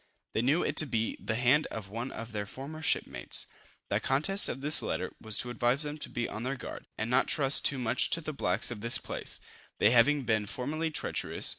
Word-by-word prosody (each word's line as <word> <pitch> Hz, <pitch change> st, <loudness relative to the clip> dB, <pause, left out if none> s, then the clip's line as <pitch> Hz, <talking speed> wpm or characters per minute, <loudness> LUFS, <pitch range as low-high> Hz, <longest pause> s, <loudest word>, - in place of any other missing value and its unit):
They 110 Hz, -, +1 dB
knew 145 Hz, +8 st, +2 dB
it -, -, -1 dB
to 155 Hz, -, +3 dB
be 115 Hz, -3 st, -1 dB
the 110 Hz, -, -2 dB
hand 125 Hz, +6 st, +3 dB
of 110 Hz, -4 st, -7 dB
one 115 Hz, +6 st, -5 dB
of 115 Hz, +1 st, -7 dB
their 105 Hz, -2 st, -4 dB
former 140 Hz, +7 st, -8 dB
shipmates. 160 Hz, -, 0 dB, 0.5 s
The -, -, +2 dB
contents 155 Hz, +10 st, +3 dB
of 135 Hz, -, -4 dB
this 150 Hz, +2 st, +4 dB
letter -, -, -3 dB
was 110 Hz, -1 st, +3 dB
to 125 Hz, -, -2 dB
advise 120 Hz, +4 st, +1 dB
them 150 Hz, +1 st, -5 dB
to -, -, -5 dB
be 120 Hz, 0 st, -2 dB
on 110 Hz, -, -6 dB
their 130 Hz, +3 st, -2 dB
guard, 125 Hz, -, -8 dB
and 110 Hz, -, -2 dB
not 125 Hz, +2 st, +2 dB
trust 140 Hz, -2 st, +4 dB
too 140 Hz, -, +3 dB
much 120 Hz, -3 st, +1 dB
to 165 Hz, -, +1 dB
the 155 Hz, -1 st, -5 dB
blacks 100 Hz, -4 st, +1 dB
of 110 Hz, -4 st, -6 dB
this 120 Hz, +3 st, +2 dB
place, -, -, -4 dB, 0.4 s
they 105 Hz, -, +4 dB
having 130 Hz, +4 st, +4 dB
been 110 Hz, -3 st, 0 dB
formerly 155 Hz, +9 st, -2 dB
treacherous. 155 Hz, -, +1 dB
125 Hz, 225 wpm, -30 LUFS, 115-150 Hz, 0.5 s, this